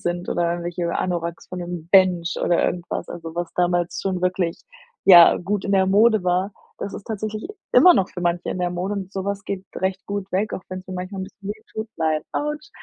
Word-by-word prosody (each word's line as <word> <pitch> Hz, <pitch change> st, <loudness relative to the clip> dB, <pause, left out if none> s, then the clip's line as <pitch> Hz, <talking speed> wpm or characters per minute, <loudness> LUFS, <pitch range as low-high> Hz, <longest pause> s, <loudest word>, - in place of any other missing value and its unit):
sind 175 Hz, +1 st, -2 dB
oder 170 Hz, -1 st, +1 dB
irgendwelche 175 Hz, 0 st, -3 dB
Anoraks 170 Hz, -2 st, -3 dB
von 180 Hz, -, -6 dB
dem 175 Hz, -2 st, -6 dB
„Bench“ 185 Hz, -3 st, +4 dB
oder 175 Hz, -, +2 dB
irgendwas, 175 Hz, 0 st, -3 dB
also, 165 Hz, -1 st, -7 dB
was 175 Hz, 0 st, -3 dB
damals 175 Hz, -1 st, 0 dB
schon 185 Hz, -2 st, -2 dB
wirklich, 180 Hz, -2 st, -1 dB, 0.4 s
ja, 175 Hz, -3 st, +9 dB
gut 195 Hz, +2 st, -2 dB
in 200 Hz, -, -1 dB
der 190 Hz, -1 st, +4 dB
Mode 215 Hz, +1 st, +4 dB
war. 185 Hz, +3 st, 0 dB, 0.3 s
Das 200 Hz, -, -5 dB
ist 200 Hz, -, -8 dB
tatsächlich 215 Hz, -, -4 dB, 0.2 s
immer 360 Hz, -1 st, +7 dB
noch 190 Hz, -, +2 dB
für 180 Hz, -, -8 dB
manche 175 Hz, 0 st, 0 dB
in -, -, -3 dB
der 180 Hz, -, 0 dB
Mode 180 Hz, +3 st, -3 dB
und 195 Hz, -1 st, -5 dB
sowas 200 Hz, +1 st, -3 dB
geht 195 Hz, -1 st, -4 dB
recht 190 Hz, +1 st, -2 dB
gut 200 Hz, -1 st, -4 dB
weg, 200 Hz, +3 st, 0 dB
auch -, -, -4 dB
wenn 185 Hz, 0 st, -5 dB
es 185 Hz, -, -20 dB
mir 185 Hz, -, -5 dB
manchmal 185 Hz, +2 st, -5 dB
ein 190 Hz, -, -3 dB
bisschen 195 Hz, +1 st, -11 dB
weh 215 Hz, +1 st, -7 dB
tut: 220 Hz, 0 st, -4 dB
„Nein, 155 Hz, -1 st, 0 dB
autsch.“ 300 Hz, +2 st, -3 dB
185 Hz, 220 wpm, -22 LUFS, 175-200 Hz, 0.4 s, ja